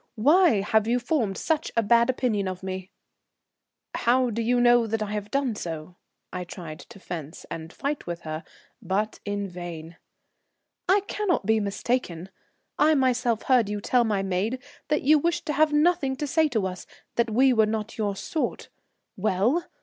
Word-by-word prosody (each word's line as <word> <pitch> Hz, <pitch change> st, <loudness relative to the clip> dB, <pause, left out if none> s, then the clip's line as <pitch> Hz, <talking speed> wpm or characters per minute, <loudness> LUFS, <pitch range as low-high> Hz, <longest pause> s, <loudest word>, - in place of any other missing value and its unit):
Why 295 Hz, -, +4 dB
have 220 Hz, +1 st, +2 dB
you 240 Hz, +1 st, +2 dB
formed 240 Hz, -6 st, -1 dB
such 320 Hz, -1 st, -1 dB
a 230 Hz, -, +4 dB
bad 235 Hz, +3 st, +4 dB
opinion 230 Hz, -6 st, 0 dB
of 185 Hz, 0 st, -5 dB
me?" 190 Hz, 0 st, -5 dB, 1.0 s
"How 250 Hz, +1 st, +2 dB
do 230 Hz, +2 st, -2 dB
you 245 Hz, +2 st, +2 dB
know 240 Hz, -1 st, +4 dB
I 210 Hz, -1 st, -3 dB
have 210 Hz, -1 st, -4 dB
done 275 Hz, -4 st, 0 dB
so?" 165 Hz, -3 st, -6 dB, 0.4 s
I 180 Hz, 0 st, -3 dB
tried 170 Hz, -3 st, -8 dB
to -, -, -13 dB
fence 165 Hz, -3 st, -7 dB
and 165 Hz, 0 st, -6 dB
fight 285 Hz, +1 st, -4 dB
with 170 Hz, -1 st, -4 dB
her, 155 Hz, 0 st, -5 dB, 0.4 s
but 210 Hz, +3 st, -1 dB
in 205 Hz, -1 st, -2 dB
vain. 170 Hz, -2 st, -8 dB, 0.9 s
"I 395 Hz, +2 st, +5 dB
cannot 400 Hz, -, -1 dB
be 220 Hz, +1 st, +3 dB
mistaken. 200 Hz, -3 st, -2 dB, 0.5 s
I 310 Hz, +1 st, +5 dB
myself 250 Hz, -4 st, +1 dB
heard 245 Hz, -6 st, +3 dB
you 210 Hz, 0 st, -2 dB
tell 245 Hz, +4 st, +2 dB
my 210 Hz, -4 st, 0 dB
maid 195 Hz, +6 st, -1 dB, 0.3 s
that 300 Hz, 0 st, 0 dB
you 300 Hz, +3 st, +5 dB
wished 340 Hz, +2 st, -1 dB
to 300 Hz, -, -1 dB
have 305 Hz, +2 st, +3 dB
nothing 295 Hz, -3 st, +2 dB
to 295 Hz, +2 st, -3 dB
say 315 Hz, +2 st, +2 dB
to 220 Hz, -9 st, -1 dB
us, 185 Hz, 0 st, -5 dB, 0.3 s
that 235 Hz, 0 st, +1 dB
we 255 Hz, +4 st, +4 dB
were 220 Hz, -2 st, +4 dB
not 220 Hz, +1 st, -4 dB
your 205 Hz, -2 st, 0 dB
sort. 310 Hz, +10 st, -3 dB, 0.5 s
Well! 215 Hz, -, +1 dB
220 Hz, 175 wpm, -26 LUFS, 190-265 Hz, 1.0 s, I